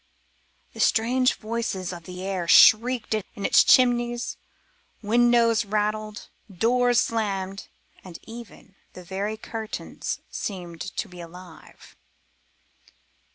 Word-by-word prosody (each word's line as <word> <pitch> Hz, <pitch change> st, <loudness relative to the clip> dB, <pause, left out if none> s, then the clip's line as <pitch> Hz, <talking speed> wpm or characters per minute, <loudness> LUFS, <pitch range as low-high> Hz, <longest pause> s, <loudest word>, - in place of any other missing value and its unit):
The -, -, -12 dB
strange 250 Hz, +3 st, +2 dB
voices 215 Hz, -5 st, -4 dB
of 170 Hz, -1 st, -10 dB
the 180 Hz, 0 st, -8 dB
air 190 Hz, -3 st, -3 dB
shrieked 230 Hz, +6 st, +5 dB
in 205 Hz, -1 st, -4 dB
its 235 Hz, -, +6 dB
chimneys 240 Hz, -1 st, +3 dB, 0.7 s
windows 235 Hz, +1 st, +3 dB
rattled, 215 Hz, 0 st, -2 dB, 0.2 s
doors 245 Hz, +5 st, +2 dB
slammed, 195 Hz, -4 st, -2 dB, 0.4 s
and 180 Hz, -3 st, -10 dB
even, 230 Hz, -3 st, -12 dB, 0.2 s
the 180 Hz, -, -11 dB
very 200 Hz, +4 st, -4 dB
curtains 220 Hz, 0 st, -5 dB
seemed 175 Hz, -5 st, -6 dB
to 195 Hz, +5 st, -4 dB
live 180 Hz, -2 st, -10 dB
and 180 Hz, -3 st, -13 dB
move. -, -, -19 dB
215 Hz, 110 wpm, -25 LUFS, 190-235 Hz, 0.7 s, its